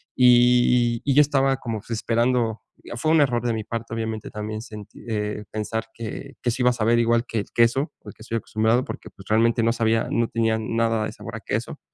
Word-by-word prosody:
y 120 -1 +4
y 140 - +1
yo 150 - +8
estaba 135 -2 +2
como 115 -5 -4
esperando, 115 0 0 0.2
y - - -14
fue 155 +7 0
un 160 - +5
error 125 -5 +2
de 120 - +1
mi 110 - -3
parte, 115 0 -5
obviamente 110 -1 -4
también 110 +1 -5
sentí, 105 -3 -11
eh, 105 -1 -2
pensar 110 +1 -3
que 115 -2 -7
que 120 - 0
si 125 +2 -3
iba 125 - +5
a - - -1
saber 115 0 +2
igual 115 0 +2
que 115 - -2
el 100 - -6
queso, 120 +6 +2
al - - -9
que - - -22
estoy 115 0 -2
acostumbrado, 110 +3 +1
porque - - -8
pues, 95 - -16
realmente 115 +2 +3
no 115 - +3
sabía, 115 -1 +1
no 115 0 +1
tenía 115 -1 +1
nada 115 0 0
de - - -4
sabor - - -9
a - - -5
queso, - - -4
115 Hz, 220 wpm, -23 LUFS, 110-120 Hz, 0.2 s, yo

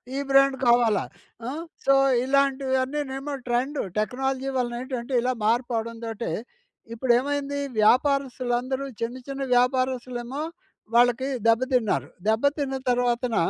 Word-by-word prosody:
ఈ - - -1
బ్రాండ్ 275 0 +5
కావాలా? 235 -2 +4 0.4
అ! - - -2 0.4
So 275 - +5 0.3
ఇలాంటివన్నీనేమో 270 +1 0
trend. 255 +4 0 0.2
Technology 265 +4 -1
వలన 240 -1 -1
ఏంటంటే 255 0 -5
ఇలా 255 +1 0
మార్పు 240 +3 +1
అవడం 230 +1 -4
తోటీ, 225 0 -4 0.6
ఇప్పుడు 240 +2 0
ఏమైంది? 285 +1 -2 0.2
వ్యాపారస్తులందరూ 260 +1 +1 0.2
చిన్న, 235 +2 -2
చిన్న 275 0 -4
వ్యాపారస్తులేమో 255 +1 0 0.5
వాళ్ళకి, 245 +2 +4 0.2
దెబ్బతిన్నారు. 230 - +2 0.2
దెబ్బ 220 +3 +1 0.2
తిన్న 270 -2 -1 0.2
తర్వాతన 245 -1 0
255 Hz, 110 wpm, -25 LUFS, 240-270 Hz, 0.6 s, బ్రాండ్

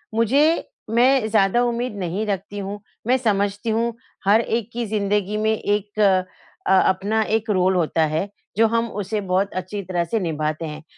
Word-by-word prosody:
मुझे 280 +9 +3 0.2
मैं 245 +1 +3
ज़्यादा 215 +2 +3
उम्मीद 240 -1 -1
नहीं 185 +4 -2
रखती 200 +1 -3
हूँ। 200 +1 -5 0.3
मैं 255 +2 +4
समझती 205 -2 0
हूँ 230 +2 0 0.3
हर 210 +3 +5
एक 230 -1 -2
की 240 0 -2
ज़िंदगी 205 -1 0
में 220 +1 +1
एक 205 0 -2 0.7
अ, - - +3
अपना 195 +3 +2
एक 220 +1 -1
रोल 190 -2 +2
होता 165 -2 +1
है 155 +6 -2 0.3
जो 225 - +5
हम 230 +1 0
उसे 205 +2 -2
बहुत 190 +2 +1
अच्छी 185 +2 -4
तरह 175 -1 -1
से 220 +7 -1
निभाते 155 -2 -2
हैं। 155 0 -7
205 Hz, 170 wpm, -22 LUFS, 190-225 Hz, 0.7 s, हर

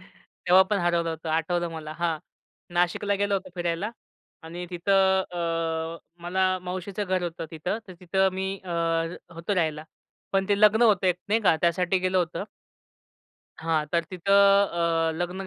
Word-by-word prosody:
तेव्हा 185 +1 +1
पण 205 - +2
हरवलं 170 -1 +1
होतं 160 0 -6
आठवलं 170 +2 0
मला 155 -1 -7
हां. 165 -2 0 0.6
नाशिकला 180 +4 +1
गेलो 200 0 0
होतो 190 -1 -3
फिरायला 175 +4 -2 0.5
आणि 175 +2 -6
तिथं 190 +2 +3
अ, 165 -1 -2 0.2
मला 185 +1 +1
मावशीचं 185 +3 -4
घर 185 -1 0
होतं 165 -1 -4
तिथं. 170 +7 -3
तर 185 - -8
तिथं 190 +2 +2
मी 190 +1 -3
अ, 180 - -7 0.6
होतो 170 +5 -2
राहायला. 155 -3 -1 0.5
पण 195 +1 +1
ते 205 0 +2
लग्न 215 +2 +6
होतं 200 -5 +4
एक 180 -1 +3
नाही 220 +2 +2
का 175 -6 +4
त्यासाठी 180 +2 +2
गेलं 185 0 +1
होतं. 175 -2 -2 1.2
हां, 160 -2 0
तर 170 -1 +2
तिथं 185 +2 -1 0.8
अ, - - -3
लग्न 175 +2 -3
180 Hz, 155 wpm, -26 LUFS, 165-190 Hz, 1.2 s, लग्न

